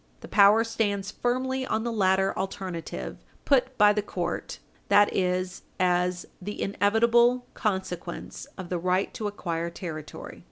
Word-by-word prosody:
The -, -, -9 dB
power 205 Hz, +2 st, +6 dB
stands 205 Hz, -3 st, -1 dB
firmly 260 Hz, +2 st, -1 dB
on 220 Hz, -3 st, -1 dB
the 235 Hz, -, -2 dB
latter 195 Hz, -2 st, +2 dB
alternative 190 Hz, -3 st, -5 dB, 0.2 s
put 260 Hz, -2 st, +2 dB
by 210 Hz, -1 st, +6 dB
the 210 Hz, -, 0 dB
court 205 Hz, -, -4 dB, 0.3 s
that 205 Hz, 0 st, +5 dB
is, 185 Hz, 0 st, -1 dB, 0.2 s
as 180 Hz, 0 st, +1 dB, 0.2 s
"the 205 Hz, +3 st, -6 dB
inevitable 235 Hz, +5 st, +3 dB
consequence 190 Hz, -4 st, -4 dB
of 185 Hz, -3 st, -7 dB
the 180 Hz, -, -1 dB
right 185 Hz, +2 st, 0 dB
to 215 Hz, -, -3 dB
acquire 170 Hz, -4 st, -3 dB
territory." 165 Hz, -3 st, -8 dB
200 Hz, 135 wpm, -27 LUFS, 180-225 Hz, 0.3 s, power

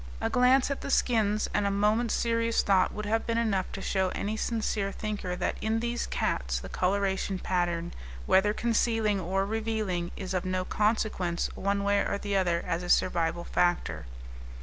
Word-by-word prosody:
A -, -, -1 dB
glance 255 Hz, +2 st, +4 dB
at 280 Hz, -, -3 dB
the -, -, -5 dB
skins 215 Hz, -6 st, +2 dB
and 205 Hz, -1 st, +1 dB
a -, -, +2 dB
moment's 210 Hz, +3 st, +2 dB
serious 230 Hz, 0 st, +1 dB
thought 195 Hz, -2 st, +3 dB
would 210 Hz, 0 st, -5 dB
have 225 Hz, +2 st, 0 dB
been 230 Hz, 0 st, 0 dB
enough 205 Hz, -5 st, 0 dB
to 195 Hz, -, -6 dB
show 190 Hz, -1 st, +1 dB
any 210 Hz, +2 st, -2 dB
sincere 215 Hz, -3 st, -1 dB
thinker 205 Hz, -4 st, -4 dB
that -, -, -2 dB
in 220 Hz, +1 st, 0 dB
these 235 Hz, +1 st, -2 dB
cats -, -, -1 dB
the -, -, -9 dB
coloration 190 Hz, 0 st, 0 dB
pattern, 175 Hz, -2 st, -1 dB, 0.3 s
whether 200 Hz, +2 st, +4 dB
concealing 225 Hz, -2 st, +1 dB
or 190 Hz, +2 st, 0 dB
revealing, 215 Hz, -5 st, -2 dB
is 190 Hz, -1 st, -5 dB
of 185 Hz, -, 0 dB
no 185 Hz, 0 st, -1 dB
consequence 210 Hz, -5 st, 0 dB
one 200 Hz, +1 st, -1 dB
way 200 Hz, 0 st, +3 dB
or 200 Hz, -, -1 dB
the 200 Hz, 0 st, -3 dB
other 175 Hz, -3 st, +1 dB
as 170 Hz, -1 st, -1 dB
a 175 Hz, -, -6 dB
survival 170 Hz, -1 st, +2 dB
factor. 85 Hz, -, 0 dB
200 Hz, 175 wpm, -28 LUFS, 185-220 Hz, 0.3 s, glance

